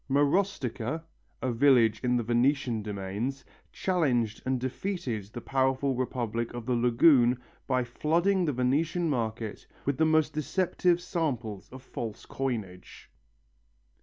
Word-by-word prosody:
Marostica, 145 - 0 0.4
a 130 - +1
village 115 -3 +4
in 125 -1 +1
the 120 - 0
Venetian 120 0 +1
domains, 105 +6 -4 0.3
challenged 125 - 0
and 130 -1 +1
defeated 130 - -3
the 115 +4 -8
powerful 130 +1 +1
Republic 120 -2 -2
of 120 -2 -6
the 125 - 0
lagoon 120 +1 +4 0.3
by 130 -2 +2
flooding 170 +10 +1
the 150 - +1
Venetian 150 +7 +1
market 115 -5 -3 0.2
with 140 -1 -1
the 160 - +5
most 155 -1 +3
deceptive 175 +3 +1
samples 130 - -3
of 130 0 -11
false 115 -4 -6
coinage. 110 - -5
130 Hz, 125 wpm, -29 LUFS, 115-150 Hz, 0.4 s, the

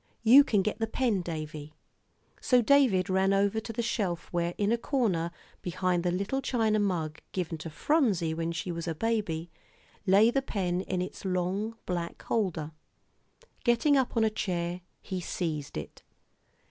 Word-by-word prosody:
"You 255 +5 +9
can 210 -8 +2
get 215 - -2
the 225 - 0
pen, 225 -4 0
Davie." 155 -3 -6 0.7
So 250 - +4
David 245 -8 +4
ran 190 0 +2
over 200 +2 +2
to 220 - -6
the 235 +1 -2
shelf 195 -7 -2
where, 175 0 0
in 205 +1 +1
a 235 - +3
corner 210 - 0 0.3
behind 180 0 0
the 180 - +1
little 200 +9 -1
china 220 -5 +1
mug 165 -6 -1
given 170 -3 -3
to 165 - -6
Phronsie 195 - +1
when 165 +1 -2
she 170 +2 -3
was 170 0 -5
a 165 - -2
baby, 180 -6 -1 0.6
lay 205 +5 +6
the 275 - +1
pen 185 -8 -1
in 185 -1 -2
its 185 - -8
long 190 +4 -1
black 175 -2 -3
holder. 175 -8 -1 0.9
Getting 240 +5 +3
up 260 -3 +1
on 225 - +4
a 220 - +2
chair, 175 -3 -2 0.2
he 185 -3 -4
seized 155 -5 -3
it. 75 - -8
190 Hz, 165 wpm, -29 LUFS, 170-225 Hz, 0.9 s, You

